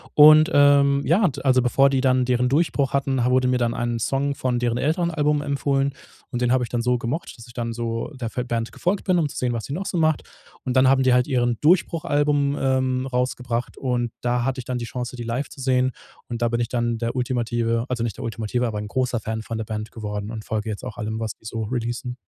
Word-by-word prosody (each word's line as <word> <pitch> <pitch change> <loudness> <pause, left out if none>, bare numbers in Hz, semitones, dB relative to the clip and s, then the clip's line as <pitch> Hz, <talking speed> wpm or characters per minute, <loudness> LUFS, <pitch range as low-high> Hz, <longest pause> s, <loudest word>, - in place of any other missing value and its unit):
Und, 155 +1 +8
ähm, 140 -1 +5
ja, 185 +7 +3
und, 145 -5 -1
also, 130 -1 +4
bevor 135 +3 +4
die 135 -1 +1
dann 130 -1 +3
deren 125 0 +1
Durchbruch 140 -2 +1
hatten, 135 -2 0
wurde 125 +1 +3
mir 125 0 +2
dann 120 -1 0
ein 120 -1 -2
Song 140 +5 0
von 125 -2 -1
deren 120 -1 0
älteren 170 +6 0
Album 150 -1 +1
empfohlen. 140 -1 0 0.4
Und 125 - -4
den 120 -1 +2
habe 130 -1 +2
ich - - -11
dann 120 -1 -1
so 125 +1 +1
gemocht, 125 +6 -4
dass 115 - -12
ich 120 - -15
dann 115 -1 -3
so 115 +3 -3
der 130 -2 -5
f 115 - -5
der 125 - -1
Band 115 -2 -3
gefolgt 185 +3 -1
bin, 185 -2 +3
um 155 -4 +1
zu - - -9
sehen, 125 -1 0
was 115 -2 -3
sie 135 - -7
noch 190 +4 -3
so 175 - -2
macht. 155 -2 +2 0.4
Und 130 -1 -2
dann 130 0 +5
haben 135 0 +4
die 130 -1 +4
halt 125 0 +3
ihren 120 -4 +1
Durchbruch-Album, 145 -4 +2
ähm, 130 -1 0
rausgebracht 125 -1 -2
und 120 -3 -1
da 120 0 0
hatte 135 0 -1
ich 120 - -7
dann 125 -1 -2
die 120 - -4
Chance, 125 +1 -5
die 120 - -6
live 120 +5 -2
zu 135 - -11
sehen. 130 -1 +1 0.3
Und 120 -1 -5
da 120 - +2
bin 120 0 -1
ich 120 - 0
dann 120 -1 -1
der 115 +1 -3
ultimative, 120 -2 0
also 120 -2 -2
nicht 115 -4 -3
der - - -5
ultimative, 115 +2 -2
aber 105 -2 -3
'n 105 0 -6
großer 125 -1 -1
Fan 110 +1 -3
von 115 0 -5
der 110 - -2
Band 110 0 -5
geworden 105 -1 -5
und 110 -2 -6
folge 110 0 -3
jetzt 105 +3 -5
auch 125 - -7
allem, 110 -1 -3
was 110 - -2
die - - -24
so 110 0 -4
releasen. 120 +2 -3
125 Hz, 255 wpm, -23 LUFS, 115-135 Hz, 0.4 s, Und